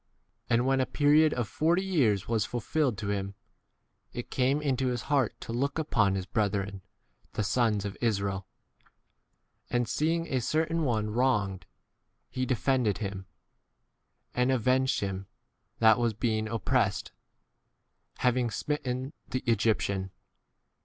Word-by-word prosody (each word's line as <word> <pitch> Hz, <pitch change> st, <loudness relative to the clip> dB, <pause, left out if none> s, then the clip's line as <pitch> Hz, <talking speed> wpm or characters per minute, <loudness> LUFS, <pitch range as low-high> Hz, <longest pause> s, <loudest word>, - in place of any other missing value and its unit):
And 120 Hz, +1 st, +3 dB
when 135 Hz, 0 st, +3 dB
a 130 Hz, -, 0 dB
period 150 Hz, +1 st, +4 dB
of 120 Hz, -6 st, -1 dB
forty 170 Hz, -, +1 dB
years 115 Hz, -, +2 dB
was 115 Hz, -3 st, +1 dB
fulfilled 125 Hz, +1 st, -1 dB
to 105 Hz, -2 st, -4 dB
him, 100 Hz, -1 st, -3 dB, 0.8 s
it 120 Hz, -, -6 dB
came 135 Hz, +3 st, +2 dB
into 135 Hz, -3 st, 0 dB
his 125 Hz, -2 st, -1 dB
heart 135 Hz, -6 st, +1 dB
to 115 Hz, -, -6 dB
look 140 Hz, +5 st, -1 dB
upon 110 Hz, -11 st, +2 dB
his 95 Hz, -1 st, -3 dB
brethren, 100 Hz, -1 st, -1 dB, 0.5 s
the 110 Hz, -, -1 dB
sons 110 Hz, -1 st, +1 dB
24 100 Hz, -, -2 dB
of -, -, -16 dB
Israel; 100 Hz, -4 st, -1 dB, 1.2 s
and 120 Hz, -1 st, 0 dB
seeing 165 Hz, +5 st, 0 dB
a 130 Hz, -5 st, -1 dB
certain 160 Hz, +5 st, 0 dB
one 110 Hz, -4 st, 0 dB
wronged, 105 Hz, -7 st, 0 dB, 0.6 s
he 130 Hz, 0 st, -2 dB
defended 125 Hz, -5 st, +1 dB
him, 100 Hz, -3 st, -5 dB, 1.1 s
and 125 Hz, +1 st, +2 dB
avenged 130 Hz, +1 st, +2 dB
him 95 Hz, -1 st, -3 dB, 0.5 s
that 110 Hz, 0 st, +5 dB
was 115 Hz, -3 st, +1 dB
being 110 Hz, -1 st, 0 dB
oppressed, 115 Hz, 0 st, 0 dB, 1.1 s
having 125 Hz, -1 st, +2 dB
smitten 130 Hz, +1 st, -3 dB
the 130 Hz, -, -2 dB
25 120 Hz, -2 st, +2 dB
Egyptian. 100 Hz, -3 st, 0 dB
120 Hz, 135 wpm, -29 LUFS, 105-130 Hz, 1.2 s, that